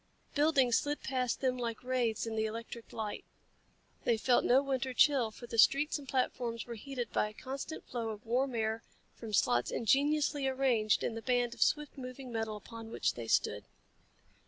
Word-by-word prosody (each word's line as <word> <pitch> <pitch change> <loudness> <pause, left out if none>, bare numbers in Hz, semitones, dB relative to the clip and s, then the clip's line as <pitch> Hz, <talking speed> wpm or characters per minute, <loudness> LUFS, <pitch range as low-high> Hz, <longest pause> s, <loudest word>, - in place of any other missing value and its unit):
Buildings 285 -5 +4
slid 290 0 -3
past 255 -3 -1
them 255 -2 +1
like 230 -1 -3
wraiths 250 -4 0
in 225 -1 -4
the 220 0 +1
electric 230 +1 -7
light. 215 -2 -4 0.8
They 235 - +2
felt 245 +2 +3
no 265 +3 +4
winter 265 -2 -2
chill, 270 -6 +4
for 230 +3 -11
the 230 -1 -3
streets 295 +6 +5
and 275 - -11
platforms 240 -3 -1
were 240 - -6
heated 245 0 -5
by 210 - +1
a - - -13
constant 275 +6 -6
flow 235 -2 -3
of 215 0 -7
warm 250 +2 0
air 220 0 -1 0.3
from 225 -2 -8
slots 120 -11 +2
ingeniously 285 +3 +2
arranged 255 -5 +2
in - - -1
the 225 - -5
band 245 -1 +1
of - - -12
swift 300 -2 +1
moving 255 0 -7
metal 225 -2 -2
upon 225 +1 -10
which - - 0
they 115 -1 -7
stood. - - +1
245 Hz, 180 wpm, -33 LUFS, 225-270 Hz, 0.8 s, streets